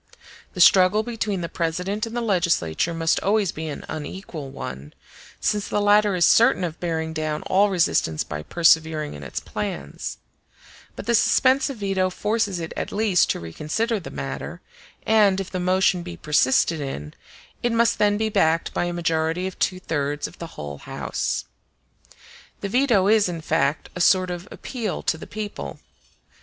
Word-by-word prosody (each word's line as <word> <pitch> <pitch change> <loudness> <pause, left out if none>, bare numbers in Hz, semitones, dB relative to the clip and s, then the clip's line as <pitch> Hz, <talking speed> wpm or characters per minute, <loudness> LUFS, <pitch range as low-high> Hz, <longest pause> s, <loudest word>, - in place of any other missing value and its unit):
The 180 - 0
struggle 185 +4 +6
between 220 -5 -2
the 170 - -2
President 180 +6 -2
and 225 - -8
the - - 0
legislature 170 - +1
must 165 -1 +1
always 205 -2 +1
be 160 +1 -6
an 150 - -6
unequal 155 -1 -6
one, 70 - -8 0.4
since 210 -1 0
the - - 0
latter 205 -1 +4
is 175 -1 +4
certain 225 -4 +5
of 165 -2 -4
bearing 160 -2 -2
down 155 -1 -2
all 205 +2 +3
resistance 165 - +1
by 75 0 -6
persevering 160 - +2
in 75 - -9
its 70 - -5
plans; 70 +1 -5 0.8
but - - -7
the 235 - +1
suspensive 265 +3 +3
veto 195 -2 0
forces 210 -1 -1
it 165 -1 -5
at - - -4
least 205 -4 +2
to - - 0
reconsider 155 - -2
the 180 - -9
matter, 70 -1 -6 0.5
and, 205 -3 +4
if 195 - -5
the 185 - -2
motion 185 0 +2
be 175 0 -8
persisted 150 +1 +2
in, 75 - -5 0.5
it 240 - +1
must 230 0 +2
then 205 0 +3
be 220 0 0
backed 165 -5 +1
by - - 0
a 175 - -2
majority 165 +1 0
of 190 - -6
two 185 - 0
thirds 145 -4 -2
of - - -15
the 170 - -9
whole 70 -1 -6
house. - - -3 1.2
The 200 - -3
veto 235 -5 +3
is, 210 -3 +4
in 170 -2 -5
fact, 155 -2 0
a 180 - -3
sort 185 0 +4
of 175 +2 -6
appeal 230 -7 -4
to 160 - 0
the - - -9
people. 210 -1 -6
180 Hz, 170 wpm, -23 LUFS, 160-205 Hz, 1.2 s, struggle